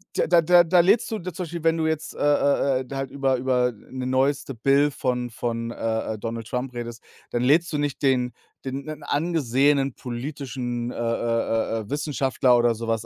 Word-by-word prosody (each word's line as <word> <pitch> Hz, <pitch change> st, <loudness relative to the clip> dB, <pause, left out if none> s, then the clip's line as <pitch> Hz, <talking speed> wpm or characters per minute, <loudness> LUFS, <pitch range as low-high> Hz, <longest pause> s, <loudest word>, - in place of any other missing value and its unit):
da -, -, +2 dB
da 170 Hz, 0 st, +5 dB
da 175 Hz, +2 st, +6 dB
da 175 Hz, +2 st, +3 dB
lädst 200 Hz, +8 st, +3 dB
du 220 Hz, -, -2 dB
zum 180 Hz, 0 st, -6 dB
Beispiel, 170 Hz, -1 st, -6 dB
wenn 165 Hz, 0 st, +3 dB
du 160 Hz, -, 0 dB
jetzt, 160 Hz, -1 st, -2 dB
äh, -, -, -11 dB
äh, 140 Hz, -2 st, +2 dB
äh, 130 Hz, +1 st, -8 dB
halt 135 Hz, -1 st, -4 dB
über 135 Hz, -2 st, +1 dB
über 125 Hz, -1 st, +1 dB
'ne 125 Hz, +4 st, -7 dB
neueste 135 Hz, +1 st, 0 dB
Bill 140 Hz, +5 st, +3 dB
von 125 Hz, -3 st, -2 dB
von, 115 Hz, 0 st, -3 dB
äh, 110 Hz, -1 st, -2 dB
äh, -, -, -9 dB
Donald 115 Hz, +1 st, -5 dB
Trump 125 Hz, +2 st, -3 dB
redest, 120 Hz, -1 st, -6 dB, 0.3 s
dann 120 Hz, -, -1 dB
lädst 160 Hz, +6 st, +3 dB
du 150 Hz, -, -1 dB
nicht 145 Hz, -2 st, -2 dB
den 125 Hz, -3 st, +2 dB, 0.3 s
den 135 Hz, +1 st, -4 dB
'nen 155 Hz, -1 st, -7 dB
angesehenen 140 Hz, -3 st, +1 dB
politischen, 125 Hz, -1 st, -5 dB
äh, -, -, -9 dB
äh, 115 Hz, -1 st, 0 dB
äh, -, -, -1 dB
äh, 105 Hz, -, -11 dB
Wissenschaftler 135 Hz, -3 st, +2 dB
oder 120 Hz, -1 st, +3 dB
so 115 Hz, +1 st, -6 dB
was 115 Hz, 0 st, -1 dB
130 Hz, 200 wpm, -24 LUFS, 120-145 Hz, 0.3 s, da